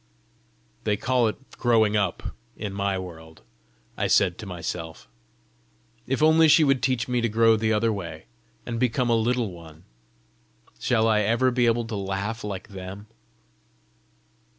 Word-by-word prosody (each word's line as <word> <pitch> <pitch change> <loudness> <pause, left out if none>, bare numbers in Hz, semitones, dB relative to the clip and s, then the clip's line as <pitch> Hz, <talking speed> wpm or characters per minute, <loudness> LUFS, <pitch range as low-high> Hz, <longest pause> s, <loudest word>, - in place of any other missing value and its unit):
"They 105 -1 0
call 125 0 +2
it 110 - -2 0.2
growing 110 -3 +3
up 100 -4 -1 0.2
in 105 -2 -5
my 100 -1 -1
world!" 80 -3 -10 0.5
I - - -1
said 90 -1 +3
to 110 - -7
myself. 85 -2 -6 1.0
"If 135 +3 0
only 160 +1 +6
she 155 +1 +6
would 135 -3 +2
teach 125 -3 0
me 125 -1 0
to 115 - 0
grow 115 +1 +4
the 110 0 0
other 110 +1 +2
way, 85 -5 -7 0.4
and 115 -1 -4
become 125 0 +1
a - - +4
Little 115 -1 0
One! 85 -1 -13 1.0
Shall 115 -3 +2
I 110 -1 +3
ever 115 +5 +2
be 120 -1 +2
able 115 0 +1
to 115 -1 -5
laugh 100 +3 -3
like 100 -1 -6
them?" 95 +1 -8
110 Hz, 150 wpm, -25 LUFS, 95-120 Hz, 1.0 s, only